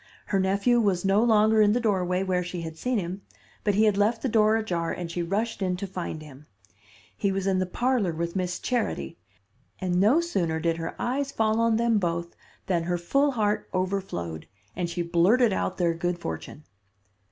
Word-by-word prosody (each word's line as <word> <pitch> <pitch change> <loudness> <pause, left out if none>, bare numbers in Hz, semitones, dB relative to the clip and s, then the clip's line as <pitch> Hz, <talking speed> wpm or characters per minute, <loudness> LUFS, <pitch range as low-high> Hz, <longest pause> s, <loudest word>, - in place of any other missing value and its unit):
Her 195 - 0
nephew 200 +6 +2
was 195 -4 +1
no 195 +2 +4
longer 220 -1 +4
in 210 0 +5
the 245 - +2
doorway 185 -5 0
where 185 -1 0
she 175 0 -5
had 160 -1 -6
seen 250 +8 -1
him, 185 0 -4 0.4
but 205 -2 +1
he 215 - +4
had 210 -2 +3
left 220 +3 +1
the 265 - +1
door 215 -1 +4
ajar 175 -7 -1
and 175 -2 -5
she 175 - -2
rushed 205 +6 -2
in 180 -1 0
to 200 - -4
find 180 -4 -5
him. 145 -1 -14 0.7
He 200 - 0
was 195 0 -2
in 190 -1 +2
the 185 - 0
parlor 240 -2 0
with 170 +2 -4
Miss 180 -1 -1
Charity, 220 - -2 0.6
and 180 -1 0
no 230 +11 +5
sooner 175 - -1
did 165 0 0
her 165 0 -5
eyes 275 +3 -1
fall 220 -2 +1
on 230 -1 +3
them 230 -2 +2
both 170 -1 -2 0.3
than 170 -3 0
her 175 0 0
full 275 +11 +1
heart 210 -3 0
overflowed, 185 - -3 0.3
and 175 -1 -2
she 175 0 -2
blurted 190 +7 +3
out 185 - -2
their 170 -2 +2
good 175 +1 -2
fortune. 145 - -7
190 Hz, 200 wpm, -26 LUFS, 170-220 Hz, 0.7 s, in